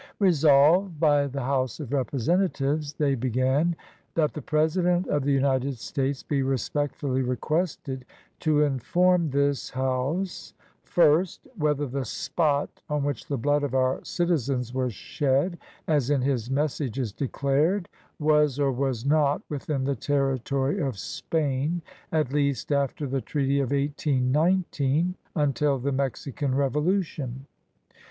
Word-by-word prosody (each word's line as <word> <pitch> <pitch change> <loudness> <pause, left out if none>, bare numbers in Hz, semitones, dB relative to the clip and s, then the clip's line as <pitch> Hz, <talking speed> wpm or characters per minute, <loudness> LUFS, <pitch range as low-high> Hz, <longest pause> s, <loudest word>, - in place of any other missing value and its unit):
Resolved 160 0 +4
by 145 -3 +3
the 135 0 -4
House 130 -2 -1
of 145 -4 -5
Representatives 145 +2 0
[they 145 -1 +1
began], 130 +6 +1 0.4
That 155 -2 +2
the 150 - -5
President 175 +5 +1
of 145 -2 0
the 145 - +2
United 135 -1 +1
States 135 +3 -2
be 140 -2 0
respectfully 135 +1 -1
requested 130 0 -2 0.3
to 150 -2 +3
inform 170 +6 +2
this 140 0 0
House 130 +8 -2
— - - -38
First. 170 +1 +2
Whether 150 -1 0
the 135 0 -3
spot 145 +4 -1
on 150 -1 0
which 140 -5 -3
the 140 - -1
blood 145 +4 +1
of 140 -2 -2
our 130 0 +2
citi 175 0 0
zens 125 -1 -3
was 130 -4 -1
shed, 145 - 0 0.3
as 145 -5 +2
in 145 -3 +2
his 125 -4 -1
messages 135 -5 -1
declared,, 145 - 0 0.3
was 150 -2 +2
or 140 -1 +2
was 130 -2 -2
not 145 0 +2
within 145 -1 -2
the 140 +1 0
territory 135 - 0
of 135 - -2
Spain, 150 - -2 0.3
at 155 -4 0
least 140 -1 0
after 140 +1 0
the 135 0 -2
treaty 140 0 0
of 135 -3 0
1819 145 +3 +1 0.2
until 145 -2 +1
the 135 +2 -2
Mexican 135 0 -2
revolution. 140 -2 -1
140 Hz, 130 wpm, -26 LUFS, 130-155 Hz, 0.4 s, Resolved